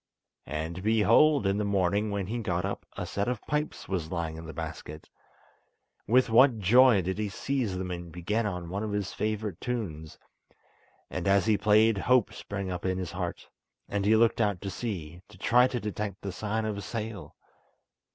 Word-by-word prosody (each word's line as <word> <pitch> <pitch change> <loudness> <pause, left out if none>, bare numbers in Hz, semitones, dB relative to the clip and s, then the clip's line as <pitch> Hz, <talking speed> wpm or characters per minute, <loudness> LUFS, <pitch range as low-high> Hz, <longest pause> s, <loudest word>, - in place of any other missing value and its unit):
And, 80 +5 -4
behold! 110 +7 +4
in 100 +1 +1
the - - 0
morning 100 +1 +1
when 100 -2 -2
he 115 +5 -3
got 90 -4 -1
up 100 - -5
a - - -3
set 100 +2 -2
of 125 -3 -1
pipes 150 +1 -3
was 90 -5 -2
lying 85 -3 -3
in 80 0 -8
the - - -6
basket. 75 +1 -7 1.0
With 125 +3 +4
what 120 +2 +5
joy 110 +1 +5
did 95 +3 -3
he 105 -1 -1
seize 120 -3 -2
them 90 0 -4
and 85 -1 -6
begin 105 +7 -1 0.2
one 100 +2 -2
of 110 -1 -3
his 100 -2 -2
favourite 105 -4 -3
tunes; 90 -11 -4 0.9
and - - -3
as 100 0 +4
he 110 -1 +4
played 105 +1 +4
hope 125 +1 +3
sprang 100 -2 -5
up 90 -1 -4
in 95 0 0
his 90 -3 -4
heart, - - -5 0.4
and 100 -1 -2
he 105 +2 +4
looked 115 +1 +3
out 105 -4 +1
to 100 - -4
sea, 90 -6 -5
to 105 - -15
try 125 +6 +4
to 125 -1 -3
detect 105 -2 -4
the 100 - -3
sign 110 +4 -2
of 105 -2 -3
a - - -5
sail. 110 -1 -6
100 Hz, 190 wpm, -28 LUFS, 90-110 Hz, 1.0 s, what